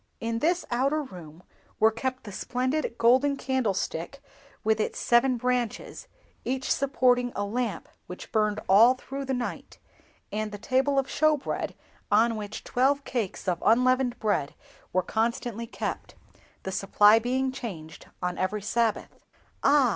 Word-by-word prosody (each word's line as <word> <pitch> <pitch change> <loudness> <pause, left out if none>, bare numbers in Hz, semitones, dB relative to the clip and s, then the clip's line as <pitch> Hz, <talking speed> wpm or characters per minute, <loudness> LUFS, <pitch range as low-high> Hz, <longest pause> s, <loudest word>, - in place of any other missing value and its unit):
In 230 0 -2
this 345 +5 +1
outer 275 +5 +1
room 175 - -12 0.4
were 220 +1 +5
kept 255 +3 -3
the 210 - -8
splendid 255 +6 -2
golden 260 +4 +4
Candlestick 250 -4 -2 0.4
with 220 0 +2
its 215 - -1
seven 245 +1 +3
branches, 245 -2 -2 0.4
each 260 +1 -2
supporting 250 -3 +2
a 205 - -1
lamp 220 -3 -3 0.2
which 180 - -9
burned 215 -1 +1
all 225 +7 +7
through 275 +2 -6
the 265 0 -1
night, 245 -1 -5 0.5
and 215 +1 -2
the 205 - -6
Table 265 +6 +1
of 270 - +3
Showbread, 305 0 0 0.3
on 225 +3 +4
which 210 0 -6
twelve 275 +3 +1
cakes 225 -8 -3
of 175 -2 0
unleavened 250 +2 +3
bread 205 - -1 0.4
were 185 0 +1
constantly 230 +1 -2
kept—the 190 -4 -7
supply 205 +3 +5
being 260 +3 0
changed 175 -12 -8 0.2
on 180 0 -2
every 195 +2 -1
Sabbath." 225 0 -1 0.4
"Ah! 280 -2 +5
235 Hz, 140 wpm, -27 LUFS, 210-260 Hz, 0.5 s, all